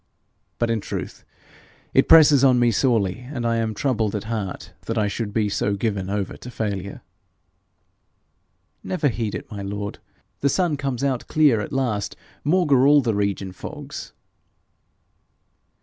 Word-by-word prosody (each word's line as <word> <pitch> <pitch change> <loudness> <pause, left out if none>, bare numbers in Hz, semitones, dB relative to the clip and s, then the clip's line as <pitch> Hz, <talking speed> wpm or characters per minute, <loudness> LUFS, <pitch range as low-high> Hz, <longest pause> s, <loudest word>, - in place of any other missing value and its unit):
But 120 -1 0
in 115 -2 0
truth - - -6 0.7
it - - +4
presses 150 -4 +8
on 130 -2 +6
me 120 -1 +4
sorely, 110 -4 +1
and 120 -5 -3
I 115 0 +1
am 110 -1 -1
troubled 110 -4 0
at 105 - -3
heart 110 -4 -5
that 115 - -2
I 105 -1 +2
should 105 +1 -3
be 105 0 +1
so 100 0 0
given 100 -3 -2
over 100 -1 -2
to 125 - -10
failure.' 100 -5 -4 1.8
'Never 170 -6 0
heed 110 -3 -3
it, - - -7
my 100 -2 -5
lord. 100 +1 -5 0.4
The 140 - +2
sun 175 -1 +1
comes 135 -3 -3
out 130 -3 -1
clear 145 -8 +3
at - - -6
last 120 -7 -1 0.3
maugre 145 -5 +4
all 145 0 +6
the 120 -4 0
region 100 -2 -1
fogs.' 90 - -8
115 Hz, 150 wpm, -23 LUFS, 100-135 Hz, 1.8 s, presses